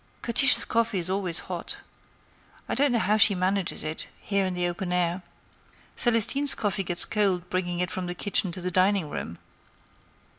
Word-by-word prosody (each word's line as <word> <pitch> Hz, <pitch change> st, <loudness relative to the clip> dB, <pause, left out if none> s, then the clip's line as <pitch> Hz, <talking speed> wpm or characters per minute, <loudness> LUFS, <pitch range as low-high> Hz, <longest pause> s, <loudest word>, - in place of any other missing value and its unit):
"Catiche's 250 Hz, +3 st, +4 dB
coffee 230 Hz, -3 st, 0 dB
is 180 Hz, 0 st, -2 dB
always 185 Hz, -4 st, 0 dB
hot. -, -, -5 dB, 0.9 s
I -, -, -3 dB
don't 285 Hz, -1 st, +2 dB
know 240 Hz, -, +1 dB
how 215 Hz, -1 st, +1 dB
she 210 Hz, -1 st, +5 dB
manages 185 Hz, +1 st, -1 dB
it, 155 Hz, +1 st, -5 dB
here 200 Hz, -2 st, -1 dB
in 185 Hz, -, -4 dB
the 175 Hz, 0 st, 0 dB
open 175 Hz, +1 st, -4 dB
air. 180 Hz, 0 st, 0 dB, 0.7 s
Celestine's 240 Hz, +4 st, +2 dB
coffee 205 Hz, -2 st, -1 dB
gets 175 Hz, -1 st, +4 dB
cold 190 Hz, -4 st, 0 dB
bringing 175 Hz, -1 st, -2 dB
it 180 Hz, -2 st, -2 dB
from 185 Hz, -1 st, -4 dB
the 175 Hz, -, -4 dB
kitchen 190 Hz, -1 st, +1 dB
to 185 Hz, -, -6 dB
the 180 Hz, +1 st, -3 dB
dining 185 Hz, -3 st, +1 dB
room. 85 Hz, -, -6 dB
185 Hz, 175 wpm, -26 LUFS, 180-210 Hz, 0.9 s, she